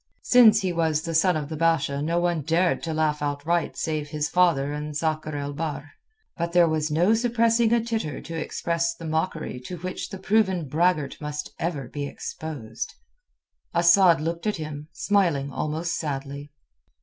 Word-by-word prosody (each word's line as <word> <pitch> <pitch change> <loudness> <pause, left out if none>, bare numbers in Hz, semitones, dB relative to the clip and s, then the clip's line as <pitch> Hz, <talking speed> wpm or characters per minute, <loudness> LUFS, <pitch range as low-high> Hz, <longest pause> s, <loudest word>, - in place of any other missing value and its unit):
Since 220 -4 +6
he 185 -2 -1
was 160 -2 +1
the 165 - -3
son 165 +1 +3
of 150 -2 -4
the 160 - -5
Basha 155 -3 +1
none 170 +1 0
dared 170 +4 +1
to 165 - -3
laugh 155 -1 0
outright 150 +3 -1
save 155 -2 -2
his 150 0 -2
father 165 -6 +2
and 150 0 -4
Sakr 155 -1 -2
el 145 0 -4
Bahr. 145 -1 -4 0.5
But 170 0 -2
there 175 -1 +6
was 155 -1 0
no 175 +8 +3
suppressing 230 0 +2
a 235 - +4
titter 220 - -3
to 165 - -8
express 170 +1 -1
the 165 - -9
mockery 160 -4 -2
to 175 +9 -7
which 185 +2 -5
the 195 - -6
proven 190 -4 +1
braggart 155 -1 0
must 150 0 -5
ever 150 -6 -2
be 145 +2 -4
exposed. 130 -8 -6 0.8
Asad 170 0 +6
looked 170 +5 -3
at 210 - 0
him, 150 -1 -6
smiling 165 -7 +1
almost 155 +4 -2
sadly. 140 -1 -5
160 Hz, 165 wpm, -25 LUFS, 150-175 Hz, 0.8 s, Since